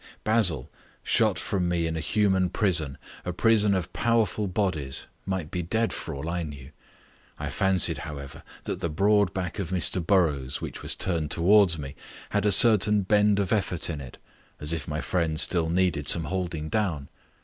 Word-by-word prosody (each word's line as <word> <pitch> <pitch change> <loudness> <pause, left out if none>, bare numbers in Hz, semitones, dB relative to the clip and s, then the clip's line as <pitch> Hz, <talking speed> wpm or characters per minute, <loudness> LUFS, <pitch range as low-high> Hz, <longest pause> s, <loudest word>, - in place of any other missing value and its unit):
Basil, 90 - +1 0.4
shut - - +1
from 90 -3 -2
me 85 -1 -1
in 80 0 -3
a - - -3
human 95 +2 +1
prison, 85 -9 +1 0.3
a 90 - -4
prison 105 +1 +3
of 90 -3 -4
powerful 110 -3 0
bodies, 90 -8 -1 0.2
might 95 -5 -3
be 90 - -3
dead 110 +7 -1
for 80 - -5
all 70 +3 -6
I 85 +1 -2
knew. 70 -4 -9 0.7
I - - -5
fancied, 95 -3 +2
however, 70 -4 -8 0.2
that - - -4
the 85 -3 -3
broad 100 +4 +2
back 95 +3 -5
of 95 -5 -4
Mr 90 -1 +2
Burrows, 75 -8 0
which - - -7
was - - +2
turned 80 -5 -1
towards 90 +1 +3
me, 70 -2 -8 0.4
had - - 0
a - - +4
certain 105 -1 +6
bend 105 +1 +2
of 100 +1 -1
effort 90 -5 -1
in 75 -3 -6
it 65 -3 -11 0.4
as 75 +2 0
if 80 -4 -4
my 75 0 -3
friend 80 -3 -1
still 80 0 +3
needed 85 -4 0
some 85 - +4
holding 85 -2 -4
down. 85 -8 -2
90 Hz, 180 wpm, -25 LUFS, 80-100 Hz, 0.7 s, certain